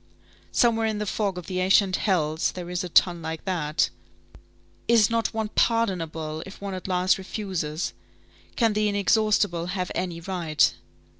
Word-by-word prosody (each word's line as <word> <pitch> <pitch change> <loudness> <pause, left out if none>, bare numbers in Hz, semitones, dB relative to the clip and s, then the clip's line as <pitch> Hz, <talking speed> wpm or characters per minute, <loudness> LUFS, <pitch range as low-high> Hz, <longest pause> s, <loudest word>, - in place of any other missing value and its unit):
Somewhere 225 -2 +3
in 215 -1 -1
the 210 - -2
fog 200 -2 -1
of 180 - -6
the 185 -1 -3
ancient 190 +1 +4
hells, 160 -5 0
there 180 -1 -7
is 180 +1 -2
a 180 - -5
tun 175 0 +4
like 160 0 -5
that. 165 -5 0 1.0
Is 230 -2 +5
not 230 0 +1
one 220 -1 -2
pardonable, 165 -10 0
if 195 - -11
one 200 -1 -5
at 185 0 -6
last 185 +1 +2
refuses! 185 -5 -3 0.6
Can 225 -3 +2
the 210 0 +1
inexhaustible 205 -3 +2
have 180 -1 -3
any 175 -2 -3
right? 170 -3 +1
185 Hz, 155 wpm, -25 LUFS, 170-210 Hz, 1.0 s, Is